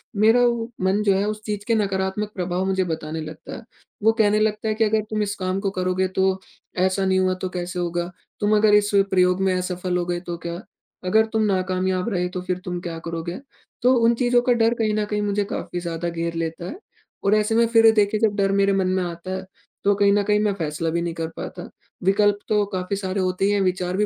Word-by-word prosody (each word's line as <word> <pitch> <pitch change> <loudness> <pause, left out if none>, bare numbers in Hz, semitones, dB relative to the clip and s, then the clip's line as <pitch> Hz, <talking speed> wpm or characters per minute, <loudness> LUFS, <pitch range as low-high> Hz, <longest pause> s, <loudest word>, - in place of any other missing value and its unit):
मेरा 220 +4 +5
वो 235 -1 0
मन 190 +3 +2
जो 200 -2 +3
है 200 - +1
उस 215 0 -3
चीज़ 205 -1 -4
के 230 - +3
नकारात्मक 195 0 -1
प्रभाव 180 0 -1
मुझे 190 0 +1
बताने 160 -2 -4
लगता 155 0 -8
है। - - -8 0.4
वो 220 - +6
कहने 215 -2 +3
लगता 215 0 0
है 215 - +1
कि 225 - +2
अगर 220 0 +2
तुम 215 -1 -1
इस 205 0 -3
काम 185 0 -2
को 195 0 -1
करोगे 185 0 0
तो 190 0 +1 0.4
ऐसा 190 +1 +2
नहीं 190 0 +2
हुआ 185 0 +2
तो 185 - -2
कैसे 180 0 -4
होगा? 175 0 -2 0.3
तुम 210 +1 +2
अगर 210 0 +4
इस 205 0 +3 0.2
प्रयोग 180 0 +3
में 190 -1 +2
असफल 180 0 -2
हो 175 - -1
गए 175 0 -2
तो 175 -1 -6
क्या? 170 0 -3 0.5
अगर 220 +4 +4
तुम 220 0 +2
नाकामयाब 185 0 0
रहे 180 -4 0
तो 180 0 -5
फिर 180 0 -2
तुम 180 -1 -3
क्या 165 -1 -5
करोगे? 165 +1 -4 0.4
तो 250 +2 +5
उन 235 - +5
चीज़ों 245 0 +3
का 245 0 +3
डर 230 0 +3
कहीं 215 -1 +1
न 210 0 0
कहीं 210 0 -1
मुझे 205 0 0
काफ़ी 175 - -4
ज़्यादा 170 0 -3
घेर 170 0 -3
लेता 165 +1 -3
है। 300 - -7 0.4
और 200 +2 +4
ऐसे 215 +1 +1
में 230 +1 +5
फिर 225 -1 +6
देखिए 210 0 +2
जब 215 -2 +2
डर 195 -1 +1
मेरे 200 0 +3
मन 190 -1 +1
में 185 0 +1
आता 175 +1 -6
है, 190 - -6 0.4
तो 205 - +4
कहीं 200 0 +4
न 205 0 +2
कहीं 210 +1 +2
मैं 210 -1 +1
फैसला 165 -3 -2
भी 170 +1 -1
नहीं 170 -1 -2
कर 165 0 -3
पाता। - - -7 0.3
विकल्प 205 +2 +3
तो 210 -1 +3
काफ़ी 185 +1 -2
सारे 195 0 -2
होते 185 +1 0
ही 200 - +3
हैं 205 -1 +2
विचार 185 -1 -1
भी 210 - +2
190 Hz, 240 wpm, -23 LUFS, 180-210 Hz, 0.5 s, वो